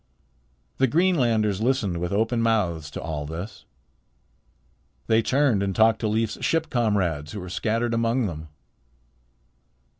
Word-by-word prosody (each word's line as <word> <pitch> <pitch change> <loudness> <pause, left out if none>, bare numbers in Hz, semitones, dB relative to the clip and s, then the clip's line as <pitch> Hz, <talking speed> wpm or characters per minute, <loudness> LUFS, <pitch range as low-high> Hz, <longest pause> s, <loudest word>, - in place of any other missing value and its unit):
The 135 - +4
Greenlanders 120 - +2
listened 115 -7 0
with 90 0 -3
open 115 +3 +1
mouths 90 -10 0
to - - -7
all 75 -3 -4
this. 90 +7 -7 1.4
They 110 0 +3
turned 130 -4 +2
and 100 -2 -1
talked 110 0 +4
to 110 - -1
Leif's 110 0 -1
ship 165 0 0
comrades 95 - 0
who 105 - -5
were 90 -1 -7
scattered 115 +5 -1
among 115 +2 +1
them. 80 -4 -5
110 Hz, 130 wpm, -24 LUFS, 90-115 Hz, 1.4 s, The